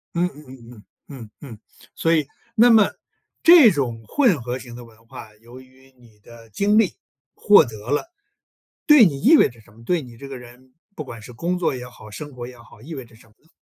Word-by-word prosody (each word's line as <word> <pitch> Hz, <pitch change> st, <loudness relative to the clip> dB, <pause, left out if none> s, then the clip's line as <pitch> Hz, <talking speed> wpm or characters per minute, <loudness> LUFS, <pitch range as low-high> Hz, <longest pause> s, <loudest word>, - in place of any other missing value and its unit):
嗯 175 Hz, +1 st, +1 dB
嗯 150 Hz, 0 st, -15 dB, 0.2 s
嗯 -, -, -13 dB, 0.3 s
嗯， 125 Hz, -7 st, -11 dB
嗯 140 Hz, -, -12 dB
嗯， 110 Hz, -, -12 dB, 0.4 s
所 165 Hz, 0 st, 0 dB
以 150 Hz, -3 st, 0 dB, 0.3 s
那 235 Hz, +2 st, +5 dB
么 220 Hz, -3 st, +5 dB, 0.5 s
这 325 Hz, -, +8 dB
种 120 Hz, -6 st, -3 dB
混 235 Hz, -, +1 dB
合 125 Hz, +2 st, -5 dB
型 120 Hz, -2 st, -12 dB
的 120 Hz, -, -11 dB
文 115 Hz, -1 st, -20 dB
化， 110 Hz, -1 st, -12 dB
由 120 Hz, +4 st, -15 dB
于 130 Hz, +1 st, -23 dB
你 115 Hz, -4 st, -23 dB
的 115 Hz, +1 st, -17 dB
经 205 Hz, -, 0 dB
历， 220 Hz, -5 st, +2 dB, 0.4 s
获 205 Hz, -6 st, +5 dB
得 110 Hz, -1 st, -11 dB
了 150 Hz, -, -2 dB, 0.8 s
对 300 Hz, -6 st, +7 dB
你 140 Hz, -7 st, -1 dB
意 320 Hz, +6 st, +6 dB
味 -, -, +4 dB
着 120 Hz, -1 st, -19 dB
什 105 Hz, -, -23 dB
么？ 115 Hz, +2 st, -18 dB
对 175 Hz, -2 st, 0 dB
你 125 Hz, -4 st, -13 dB
这 140 Hz, -, -10 dB
个 135 Hz, -, -8 dB
人 125 Hz, +1 st, -16 dB, 0.2 s
不 155 Hz, -, -6 dB
管 115 Hz, -4 st, -10 dB
是 115 Hz, -, -12 dB
工 175 Hz, +9 st, -3 dB
作 170 Hz, -6 st, -1 dB
也 125 Hz, -1 st, -8 dB
好， 110 Hz, -3 st, -15 dB
生 145 Hz, +7 st, -9 dB
活 120 Hz, -1 st, -7 dB
也 125 Hz, -1 st, -13 dB
好， 110 Hz, -2 st, -18 dB
意 160 Hz, +6 st, -10 dB
味 135 Hz, -4 st, -8 dB
着 115 Hz, -, -21 dB
什 110 Hz, 0 st, -21 dB
么 105 Hz, -, -27 dB
呢？ 160 Hz, -, -31 dB
130 Hz, 245 characters per minute, -21 LUFS, 115-165 Hz, 0.8 s, 这